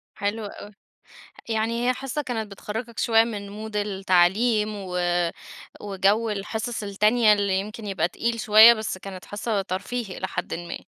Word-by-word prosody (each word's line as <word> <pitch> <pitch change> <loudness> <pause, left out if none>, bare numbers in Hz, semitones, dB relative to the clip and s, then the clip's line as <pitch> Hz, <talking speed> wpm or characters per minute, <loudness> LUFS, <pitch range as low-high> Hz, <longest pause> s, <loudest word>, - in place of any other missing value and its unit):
حلو 205 +2 -2
أوي. 205 0 -9 0.8
يعني 230 +2 0
هي 255 - +3
حصة 270 +3 -4
كانت 225 -6 -4
بتخرجك 225 +4 -6
شوية 225 -1 +4
من 205 -3 -5
مود 215 +1 -8
التعليم 205 +2 +2
و 185 -3 -5 0.8
وجو 205 +3 +1
الحصص 220 +3 -3
التانية 210 +2 +3
اللي 200 -2 +1
يمكن 210 +2 -7
يبقى 185 -4 0
تقيل 230 +5 -2
شوية، 220 +2 +8
بس 215 -4 -4
كانت 185 -1 -9
حصة 205 0 -2
ترفيهي 195 +2 -4
إلى 190 - -3
حدٍ - - -4
ما. 170 0 -6
210 Hz, 150 wpm, -24 LUFS, 195-225 Hz, 0.8 s, شوية